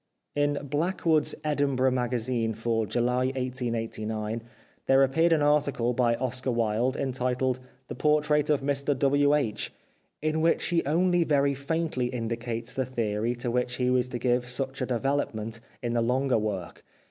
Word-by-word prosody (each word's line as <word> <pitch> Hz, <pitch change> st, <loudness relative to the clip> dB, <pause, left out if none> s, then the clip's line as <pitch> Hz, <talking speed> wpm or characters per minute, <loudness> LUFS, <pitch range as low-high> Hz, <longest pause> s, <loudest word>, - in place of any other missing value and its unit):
In 145 Hz, 0 st, +1 dB
Blackwood' 155 Hz, +2 st, +1 dB
s -, -, -1 dB
Edinburgh 140 Hz, -3 st, +1 dB
Magazine 120 Hz, -2 st, -1 dB
for 115 Hz, -1 st, -1 dB
July 125 Hz, +2 st, +1 dB
1889 115 Hz, -4 st, -3 dB, 0.5 s
there 135 Hz, 0 st, +6 dB
appeared 160 Hz, +6 st, +3 dB
an 155 Hz, -2 st, +3 dB
article 140 Hz, -5 st, +2 dB
by 120 Hz, -1 st, +2 dB
Oscar 130 Hz, +1 st, -2 dB
Wilde 115 Hz, +2 st, +1 dB
entitled 130 Hz, -1 st, -1 dB
" 130 Hz, 0 st, -35 dB
The -, -, -5 dB
Portrait 150 Hz, 0 st, +2 dB
of 150 Hz, -2 st, +3 dB
Mr 140 Hz, 0 st, 0 dB
W. 145 Hz, +1 st, +3 dB
H./' 115 Hz, -8 st, -1 dB, 0.5 s
in 155 Hz, +1 st, 0 dB
which 165 Hz, 0 st, +2 dB
he 170 Hz, -1 st, +2 dB
only 175 Hz, +3 st, +3 dB
very 140 Hz, -3 st, +2 dB
faintly 140 Hz, -2 st, -1 dB
indicates 115 Hz, 0 st, -4 dB
the 130 Hz, -, 0 dB
theory 115 Hz, -1 st, -1 dB
to 120 Hz, 0 st, -2 dB
which 125 Hz, 0 st, 0 dB
he 125 Hz, 0 st, +1 dB
was 125 Hz, -1 st, +2 dB
to 125 Hz, -, -4 dB
give 125 Hz, 0 st, 0 dB
such 135 Hz, +2 st, -3 dB
a 130 Hz, -, 0 dB
development 115 Hz, -4 st, -1 dB, 0.2 s
in 120 Hz, -1 st, -1 dB
the 120 Hz, -, +2 dB
longer 125 Hz, +1 st, +2 dB
work. 100 Hz, -5 st, -4 dB
130 Hz, 160 wpm, -27 LUFS, 120-145 Hz, 0.5 s, there